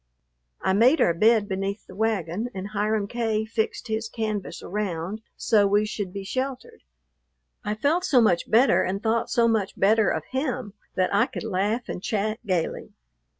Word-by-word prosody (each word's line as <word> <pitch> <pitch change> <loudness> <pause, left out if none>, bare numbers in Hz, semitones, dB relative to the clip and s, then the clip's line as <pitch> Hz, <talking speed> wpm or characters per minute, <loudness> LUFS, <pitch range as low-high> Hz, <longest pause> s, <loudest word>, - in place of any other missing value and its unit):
I 190 - +2
made 245 +10 +5
our 170 - +4
bed 215 +4 +3
beneath 195 +1 -3
the - - -13
wagon, 215 0 -1
and 190 +1 -5
Hiram 210 0 0
K. 220 -1 -1
fixed 220 +2 -2
his 220 0 -2
canvas 215 -4 -4
around, 195 0 -3 0.2
so 210 -3 +3
we 205 +2 +3
should 205 -3 -4
be 200 +1 -6
sheltered. 265 - -4 0.8
I 210 -1 -2
felt 305 +10 +1
so 285 -9 +4
much 195 -7 +2
better 225 -5 +5
and 195 +2 -2
thought 225 0 +1
so 235 -1 +3
much 215 -4 0
better 215 +2 +4
of - - -2
him 255 -5 -2 0.2
that 185 0 +1
I 200 - +4
could - - -6
laugh 215 +3 -1
and - - -5
chat 215 +2 -1
gayly. 180 -4 -2
215 Hz, 170 wpm, -25 LUFS, 195-230 Hz, 0.8 s, made